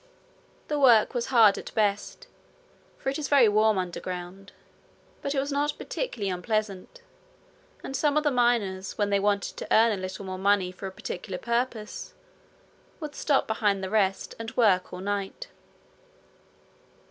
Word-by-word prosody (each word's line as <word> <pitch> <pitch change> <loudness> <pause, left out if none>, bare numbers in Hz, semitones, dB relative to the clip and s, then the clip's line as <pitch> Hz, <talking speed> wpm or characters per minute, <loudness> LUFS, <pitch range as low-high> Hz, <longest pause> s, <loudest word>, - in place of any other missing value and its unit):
The 295 -1 -1
work 240 -6 +5
was 240 -2 -2
hard 225 -6 +5
at - - -9
best, 205 -1 -1 0.7
for - - -3
it 275 - -3
is 295 - -3
very 275 -5 +6
warm 215 0 +3
underground; 180 +1 -5 0.7
but 280 - -2
it - - +2
was 280 +2 -2
not 290 +1 0
particularly 215 - -3
unpleasant, 215 - -3 0.8
and 270 - -5
some 290 +1 +1
of 305 - +2
the 295 - +2
miners, 230 -7 0
when 205 -1 0
they 200 - +3
wanted 200 0 0
to - - -6
earn 225 +1 +5
a 200 -3 -3
little 190 +1 -6
more 185 0 -5
money 195 -2 +2
for 190 +1 -7
a - - -7
particular 190 -1 -6
purpose, 235 -1 -3 0.8
would 305 -3 -6
stop 285 -3 +1
behind 205 -3 0
the 190 - -4
rest 195 -3 +1
and 225 -1 -7
work 200 -7 +3
all 180 - -7
night. 205 - -4
210 Hz, 160 wpm, -27 LUFS, 195-250 Hz, 0.8 s, very